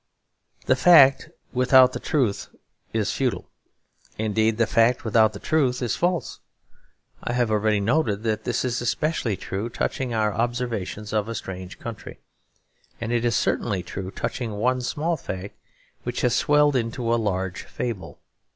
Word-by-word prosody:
The - - +4
fact 145 -6 +6 0.2
without 130 0 +5
the - - -4
truth 125 -10 0 0.4
is 110 -2 -1
futile; 130 -3 -1 0.7
indeed 110 0 +1
the 115 - +3
fact 115 +3 +2
without 110 0 +4
the - - -8
truth 135 -6 +1
is 120 -3 -1
false. 175 -1 -1 0.8
I 120 - -2
have 120 -2 +1
already 105 0 +2
noted 110 -1 0
that 110 -1 -1
this 120 +1 -1
is 125 0 -1
especially 120 - -1
true 100 +4 -4
touching 125 +1 -2
our 110 -2 +1
observations 115 -3 -3
of 105 0 0
a 115 - -4
strange 95 -2 -7
country; 115 -3 -8 0.8
and 115 0 -3
it 120 -1 +1
is 120 -1 +1
certainly 100 -6 0
true 95 +1 -6
touching 110 +3 -4
one 125 +5 0
small 160 +6 -1
fact 95 -4 -6 0.5
which 120 0 -4
has 125 -2 +2
swelled 150 -1 +3
into 115 -1 -1
a 120 - +1
large 95 -3 -2
fable. 115 -6 -5
115 Hz, 150 wpm, -24 LUFS, 105-125 Hz, 0.8 s, fact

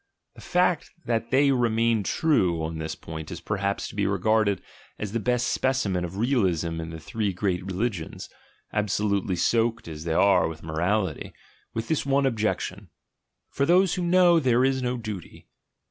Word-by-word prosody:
The - - -14
fact 180 -2 +1 0.2
that 115 -1 -1
they 140 +2 +4
remained 115 -4 +1
true 90 - +2
on 80 0 -4
this 80 0 -4
point 80 -1 -8
is 85 - -6
perhaps 100 +2 -2
to - - -11
be 100 -1 +1
regarded 100 +1 +1 0.3
as 105 -2 -4
the 115 - -1
best 125 +3 0
specimen 115 -9 0
of 90 +2 -5
realism 90 - +1
in 80 - -6
the 80 0 -7
three 105 +5 -2
great 90 -1 -1
religions, 95 -2 -3 0.5
absolutely 100 -2 0
soaked 115 +3 +1
as 80 -1 -7
they 80 -1 -1
are 100 +2 +4
with 80 0 -8
morality, 90 +6 -1 0.4
with 115 0 -3
this 160 - 0
one 140 0 +2
exception. 105 -5 -2 0.6
"For 140 - 0
those 180 +1 +4
who 180 - -2
know, 175 -1 +5
there 125 -3 +3
is 135 -1 +1
no 125 0 -1
duty." 105 -6 -8
105 Hz, 165 wpm, -26 LUFS, 90-125 Hz, 0.6 s, know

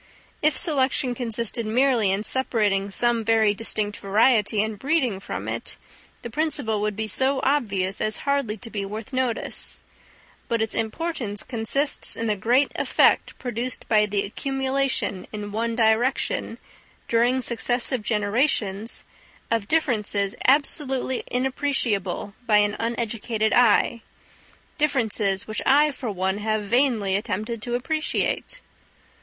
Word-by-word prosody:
If 305 -2 +2
selection 270 -4 +1
consisted 235 -1 -1
merely 230 -2 +2
in 195 +2 0
separating 210 -6 +1
some 235 +2 +1
very 220 -1 +3
distinct 210 -1 -1
variety 210 0 +3
and 215 -2 -5
breeding 265 -9 +1
from - - -6
it, - - -4 0.5
the 235 - -5
principle 285 -7 -1
would 210 -1 -1
be 220 +1 -3
so 265 +6 +1
obvious 200 -9 0
as 215 0 0
hardly 280 -6 0
to 230 +2 -8
be 200 -2 -3
worth 215 +5 -7
notice; 255 -3 -1 0.6
but 230 - 0
its 220 -1 -1
importance 225 -3 -3
consists 260 +4 +1
in 230 - -2
the 215 -2 +1
great 245 +8 +2
effect - - +2
produced 245 0 -3
by 210 -1 +3
the 200 -1 0
accumulation 270 -3 -1
in 210 -1 -6
one 230 +2 -2
direction, 225 +3 +1 0.5
during 240 +3 +2
successive 245 0 -1
generations, 210 -1 0 0.5
of 225 -3 0
differences 210 -10 0
absolutely 265 -2 +1
inappreciable 250 -7 -1
by 210 -2 +5
an 205 0 +2
uneducated 230 -1 -1
eye—differences 230 -2 0
which 215 - -4
I 295 +2 +4
for 255 -3 -5
one 190 0 -1
have 215 0 -1
vainly 225 -4 +2
attempted 215 +3 -3
to 240 +2 -2
appreciate. 315 - -1
230 Hz, 125 wpm, -24 LUFS, 210-260 Hz, 0.6 s, by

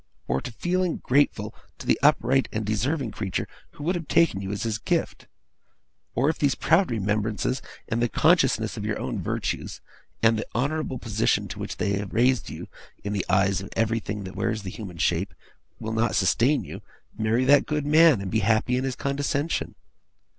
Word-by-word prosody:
or 65 +2 0
to - - -6
feeling 180 +4 0
grateful 140 +3 +1 0.2
to - - -9
the - - +2
upright 130 +3 +3
and 110 0 -2
deserving 120 +5 -1
creature 95 -3 -3 0.3
who 145 - -9
would 175 +4 +1
have 170 -4 -4
taken 165 -13 +3
you 95 0 -4
as 100 - -3
his 110 -1 -2
gift. - - -2 0.9
Or, 130 +5 +2
if 160 - 0
those 140 -4 +2
proud 170 +8 +3
remembrances, 110 +3 -1 0.3
and 115 0 -1
the 120 - +2
consciousness - - +2
of - - -4
your - - -1
own - - -3
virtues, - - -3 0.4
and 110 -1 +4
the - - -4
honourable 140 +2 -1
position 110 -2 0
to - - -7
which - - -5
they 100 0 0
have 100 -2 -6
raised 125 +2 +2
you - - -7 0.4
in 100 - -3
the 100 -3 -2
eyes 95 0 +2
of 95 - -8
everything 110 -2 -1
that 95 0 -8
wears 110 -2 -1
the 95 - -5
human 95 -5 -8
shape, 85 +4 0 0.4
will 110 0 -4
not 115 0 +1
sustain 120 +9 +3
you, - - -8 0.3
marry 110 +4 +1
that 140 +1 +5
good 150 -1 -1
man, 155 -5 +6
and 95 -2 -5
be 110 - +2
happy 110 +4 +2
in 130 - -1
his 135 -2 -2
condescension. 145 +3 -2
115 Hz, 190 wpm, -25 LUFS, 105-140 Hz, 0.9 s, man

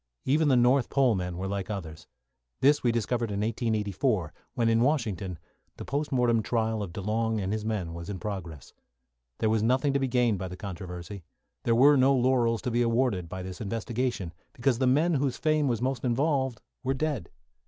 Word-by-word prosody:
Even 150 +3 +3
the 135 - +4
North 125 +2 +3
Pole 135 -4 +3
men 90 -3 -3
were 95 +1 -3
like 100 0 -3
others. 85 -7 -6 0.5
This 145 +2 +4
we 120 - +2
discovered 115 0 -1
in 100 0 -2
1884, 105 - -1 0.2
when, 115 -2 +1
in 115 0 +3
Washington, 110 - 0 0.4
the - - -7
post 145 +2 -2
mortem 120 -3 +3
trial 110 -1 -1
of 100 -4 -5
DeLong 110 +4 -1
and 95 +1 -2
his 110 -1 -2
men 100 -7 -2
was 85 +2 -7
in 100 - -4
progress. 90 - -6 0.6
There 110 - +1
was 110 -1 +2
nothing 130 +5 +2
to 140 - +2
be 135 - 0
gained 120 -5 +2
by 95 - -3
the 90 0 -8
controversy. 90 0 -7 0.4
There 115 - +3
were 140 +4 +6
no 135 +1 +5
laurels 120 -3 +2
to 125 - -1
be 120 +1 +1
awarded 115 -7 +1
by 95 +1 -5
this 95 +2 -7
investigation, 115 -3 -2 0.2
because 125 0 0
the 130 - +2
men 155 +7 +3
whose 135 -3 0
fame 155 -2 +1
was 120 -2 -1
most 130 -2 -1
involved 130 -1 0 0.2
were 135 +1 0
dead. 145 - -2
115 Hz, 195 wpm, -28 LUFS, 100-130 Hz, 0.6 s, were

